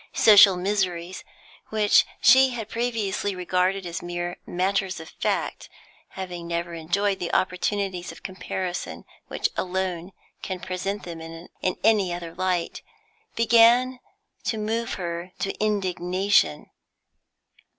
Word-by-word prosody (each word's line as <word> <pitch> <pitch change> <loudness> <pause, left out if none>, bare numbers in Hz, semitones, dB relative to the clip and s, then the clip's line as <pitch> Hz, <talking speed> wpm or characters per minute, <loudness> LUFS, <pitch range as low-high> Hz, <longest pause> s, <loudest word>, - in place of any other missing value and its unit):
Social 200 -3 +7
miseries, 185 -2 -2 0.5
which 215 -1 +4 0.2
she 260 +4 +7
had 230 -4 -6
previously 220 -4 -2
regarded 185 +1 0
as 170 0 -5
mere 175 0 -4
matters 190 +1 -1
of 160 - -10
fact, - - -2 0.5
having 180 -3 -6
never 170 0 -3
enjoyed 190 +5 -1
the 175 -2 -3
opportunities 185 0 -1
of - - -14
comparison 185 -1 -5 0.2
which - - -1
alone 185 -1 -2 0.3
can 185 -2 -4
present 190 +2 -4
them 170 -2 -7
in 165 +1 -10 0.3
any 205 -4 +3
other 170 -1 -5
light, 180 -1 -2 0.5
began 235 +3 +5 0.5
to 225 - -1
move 225 +2 -2
her 175 0 -5
to 195 - -2
indignation. 185 - +1
185 Hz, 115 wpm, -25 LUFS, 175-205 Hz, 0.5 s, Social